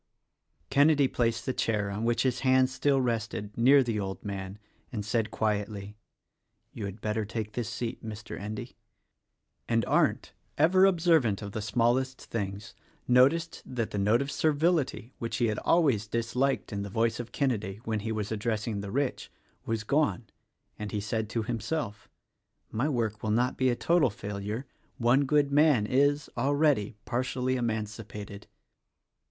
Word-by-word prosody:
Kenedy 145 0 +5
placed 115 -2 0
the 130 - -1
chair 105 -4 0
on 105 +3 -3
which 120 0 +2
his 130 -2 0
hand 130 -1 +3
still 140 +1 +2
rested, 110 -4 -2
near 135 +4 +6
the 115 -3 -1
old 95 +1 -5
man 95 -1 -5 0.3
and 105 -5 -4
said 110 +1 0
quietly, 105 -1 -2 0.8
"You 105 - -5
had 100 +2 -7
better 105 0 -1
take 110 0 -4
this 120 -4 -3
seat, 120 -2 -4
Mr. 110 -1 -7
Endy," 105 +2 -6 0.9
and 115 -2 +2
Arndt - - +1
— - - -42
ever 190 +1 +6
observant 160 - +3
of 100 - -6
the 110 - -4
smallest 120 +5 +1
things 100 0 -5 0.2
— - - -35
noticed 135 +7 +3
that 120 -4 -3
the 100 - -2
note 110 +6 +3
of 140 - -5
servility 150 -5 +1
(which 115 - -3
he 120 -2 +2
had 105 - -1
always 135 -12 +2
disliked 115 +3 -1
in 100 - -2
the 100 - -5
voice 115 +3 0
of 120 -1 -6
Kenedy 110 -9 -1
— - - -30
when 110 -1 -1
he 110 +2 -3
was 105 -1 -3
addressing 110 -1 -2
the 100 - -6
rich) 135 +4 -2 0.4
was 115 -1 -1
gone; 140 -1 +1 0.5
and 105 -1 -5
he 105 - -1
said 110 +1 -2
to 115 0 -1
himself, 115 -2 -3 0.6
"My 125 +8 0
work 110 -6 -1
will 110 - -2
not 120 +4 +2
be 130 0 +2
a 120 - +1
total 165 0 +3
failure: 105 +4 -5 0.3
one 130 +3 +3
good 145 0 +2
man 145 -6 +4
is, 145 +5 +2
already, 140 -4 +2
partially 130 +1 -1
emancipated." 105 -3 -4
115 Hz, 165 wpm, -29 LUFS, 105-130 Hz, 0.9 s, near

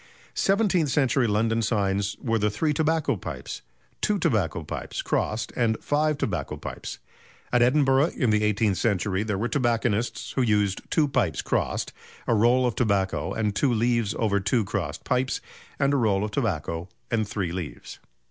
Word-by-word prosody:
Seventeenth 195 -6 +2
century 130 -2 +2
London 115 +2 +1
signs 100 -2 0
were 115 -2 0
the 105 +1 +2
"Three 150 +9 0
Tobacco 160 -3 +1
Pipes," - - -6 0.4
"Two 210 -1 +2
Tobacco 85 - 0
Pipes" - - -5
crossed, 110 +1 -1
and 115 -2 +1
"Five 150 0 +1
Tobacco - - -2
Pipes." - - -7 0.6
At 120 - +4
Edinburgh 135 +3 +4
in 125 -7 +2
the 105 0 +2
eighteenth 105 -2 +1
century 100 -3 +1
there 105 -2 -1
were 110 +5 0
tobacconists 120 -3 0
who 130 - 0
used 105 -4 +2
two 155 -2 +3
pipes 95 - 0
crossed, - - -1 0.3
a - - +2
roll 120 +4 +4
of 120 - +1
tobacco 100 -5 0
and 105 -2 -1
two 140 - +2
leaves 115 -2 +1
over 100 -3 +1
two 115 +4 +1
crossed - - -3
pipes, 130 +1 0 0.4
and 140 0 +2
a - - +3
roll 105 -5 +2
of 105 - -3
tobacco 85 - -2 0.2
and 110 -3 +1
three 100 -5 -2
leaves. 90 -3 -6
115 Hz, 165 wpm, -26 LUFS, 100-130 Hz, 0.6 s, At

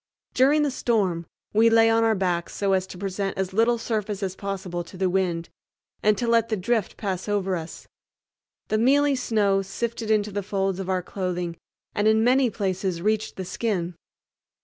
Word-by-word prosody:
During 285 +4 +4
the 290 - +1
storm 195 -10 0 0.3
we 225 +2 +5
lay 225 0 +5
on 225 0 +3
our 225 -1 +3
backs 180 -3 -1
so 200 -1 +1
as 190 0 +1
to 185 - -10
present 195 +1 -3
as 190 0 -2
little 230 +3 +3
surface 215 -3 -3
as 190 -1 -2
possible 190 -3 -4
to 185 - -13
the 185 -1 +1
wind, 175 -3 0 0.5
and 210 -1 +3
to 235 - -1
let 230 -1 +3
the 220 - 0
drift 215 +2 -1
pass 190 -1 -3
over 195 -2 0
us. 165 -1 -7 0.8
The 215 - +1
mealy 285 +4 +4
snow 210 -6 +1
sifted 225 +3 -4
into 210 -1 +2
the 205 +1 -2
folds 195 -1 -1
of 190 -1 -4
our 185 -1 0
clothing 180 -2 -3 0.4
and 205 +1 +1
in 220 0 +4
many 255 +1 +4
places 190 -4 -2
reached 215 +4 0
the 190 - -5
skin. 180 -3 -2
200 Hz, 185 wpm, -25 LUFS, 185-225 Hz, 0.8 s, we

